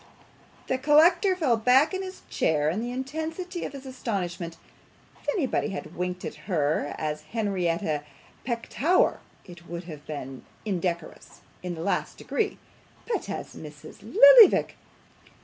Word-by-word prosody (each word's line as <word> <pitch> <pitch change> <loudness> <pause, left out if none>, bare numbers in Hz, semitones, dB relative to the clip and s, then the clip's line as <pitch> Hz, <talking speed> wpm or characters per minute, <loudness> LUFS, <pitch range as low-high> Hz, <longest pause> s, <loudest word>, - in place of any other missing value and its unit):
The 260 - -1
collector 335 +7 +5
fell 280 -10 +2
back 255 - +4
in 380 - -2
his 375 0 -8
chair 150 -1 +1
in 200 +6 -2
the 240 - -3
intensity 320 +7 -4
of - - -6
his 275 -1 -9
astonishment. 185 -10 -4 0.6
If - - -5
anybody 285 - 0
had 180 -4 -7
winked 180 0 -3
at - - -8
her 150 -4 0
as 150 -1 -3
Henrietta 175 -4 -1 0.4
Petowker, 260 +8 +1 0.3
it 175 -2 -13
would 170 +1 -6
have 155 -4 -10
been 135 -3 -7 0.2
indecorous 175 -4 -4 0.2
in 180 -1 -4
the 160 - -6
last 200 - -1
degree; 430 -2 -2 0.5
but 470 - -2
as - - -5
Mrs. - - -11
Lillyvick! - - +7
215 Hz, 135 wpm, -26 LUFS, -, 0.6 s, Lillyvick